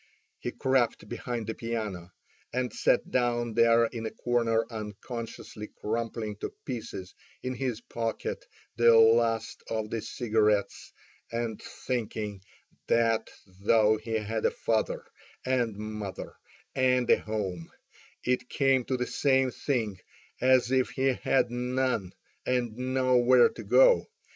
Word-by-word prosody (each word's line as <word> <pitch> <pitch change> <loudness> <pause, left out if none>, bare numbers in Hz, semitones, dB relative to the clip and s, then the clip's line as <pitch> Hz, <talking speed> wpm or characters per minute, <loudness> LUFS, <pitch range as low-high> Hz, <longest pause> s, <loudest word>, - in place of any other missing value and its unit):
He - - -3
crept 130 -3 0
behind 120 -1 -4
the 110 - -3
piano, 110 -7 -4 0.4
and 125 -2 -2
sat - - +1
down 120 -2 +1
there 115 0 +5
in 115 -1 -4
a - - -2
corner 115 -2 +1
unconsciously 110 0 -7
crumpling 110 -1 -3
to - - -5
pieces 110 -7 -6 0.3
in 130 - -2
his 125 -2 -3
pocket 115 -2 -4 0.3
the 120 -1 +6
last 115 0 +3
of 110 -1 -2
the 115 - -2
cigarettes, 105 -4 0 0.4
and 115 -2 -3
thinking 110 -5 -4 0.5
that 115 -1 +2 0.3
though 110 +1 +4
he 110 +1 -6
had 110 0 -2
a - - +3
father 110 -1 -1 0.4
and 125 -4 +1
mother 105 -3 -6 0.4
and 125 -2 +2
a - - +5
home, 95 -6 -4 0.5
it 125 0 0
came 135 -2 +2
to 130 - -1
the 125 - -1
same 135 -1 +2
thing 110 -10 -2 0.4
as 130 -1 +4
if 130 -1 +2
he 135 +1 +1
had 125 -1 +1
none, 125 -5 -1 0.3
and 120 -3 0
nowhere 130 -1 +4
to - - -9
go - - +6
to. - - -14
115 Hz, 130 wpm, -28 LUFS, 110-125 Hz, 0.5 s, the